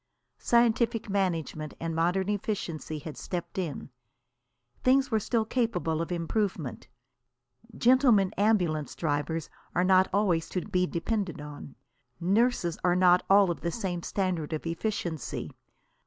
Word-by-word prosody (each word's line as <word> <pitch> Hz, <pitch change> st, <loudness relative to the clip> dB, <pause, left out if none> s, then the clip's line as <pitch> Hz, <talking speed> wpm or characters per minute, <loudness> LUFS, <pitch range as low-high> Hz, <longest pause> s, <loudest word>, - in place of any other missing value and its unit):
Scientific 235 Hz, -2 st, +2 dB
management 165 Hz, -6 st, -1 dB
and 165 Hz, -1 st, -3 dB
modern 180 Hz, +3 st, +1 dB
efficiency 190 Hz, -7 st, -3 dB
had 150 Hz, 0 st, -8 dB
stepped 180 Hz, +1 st, -5 dB
in. 155 Hz, -6 st, -4 dB, 0.9 s
Things 265 Hz, +1 st, +3 dB
were 220 Hz, -, +3 dB
still 225 Hz, +1 st, 0 dB
capable 180 Hz, -10 st, 0 dB
of 165 Hz, -, -4 dB
improvement. 175 Hz, -, -2 dB, 0.9 s
Gentlemen 240 Hz, -6 st, +4 dB
ambulance 180 Hz, -, +1 dB
drivers 160 Hz, +1 st, -2 dB, 0.3 s
are 180 Hz, -, +3 dB
not 185 Hz, 0 st, +4 dB
always 185 Hz, -5 st, +1 dB
to 180 Hz, -, -2 dB
be 180 Hz, -2 st, 0 dB
depended 185 Hz, 0 st, -2 dB
on. 145 Hz, -1 st, -9 dB, 0.4 s
Nurses 195 Hz, -1 st, +1 dB
are 180 Hz, -1 st, +3 dB
not 180 Hz, 0 st, +5 dB
all 195 Hz, -2 st, +6 dB
of 170 Hz, -, -5 dB
the 170 Hz, -, -1 dB
same 175 Hz, -2 st, -3 dB
standard 175 Hz, -5 st, -2 dB
of 155 Hz, -, -4 dB
efficiency. 170 Hz, -, -3 dB
180 Hz, 125 wpm, -28 LUFS, 165-210 Hz, 0.9 s, all